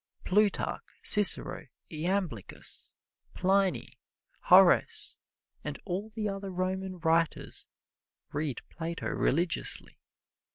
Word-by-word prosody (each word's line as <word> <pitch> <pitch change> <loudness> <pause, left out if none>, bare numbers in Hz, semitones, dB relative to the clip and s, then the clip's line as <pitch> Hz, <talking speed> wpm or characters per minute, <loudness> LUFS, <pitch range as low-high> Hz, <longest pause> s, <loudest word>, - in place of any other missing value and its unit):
Plutarch, 205 +1 -1 0.2
Cicero, 205 -6 +6 0.2
Iamblichus, 170 - -3 0.4
Pliny, 190 0 -2 0.5
Horace - - +4 0.4
and - - -7
all 195 +3 -5
the 215 -1 -5
other 195 0 -6
Roman 185 +1 -5
writers 165 -1 -2 0.7
read 145 -3 -4
Plato 165 +1 -7
religiously. 170 +4 0
185 Hz, 80 wpm, -27 LUFS, 165-195 Hz, 0.7 s, Cicero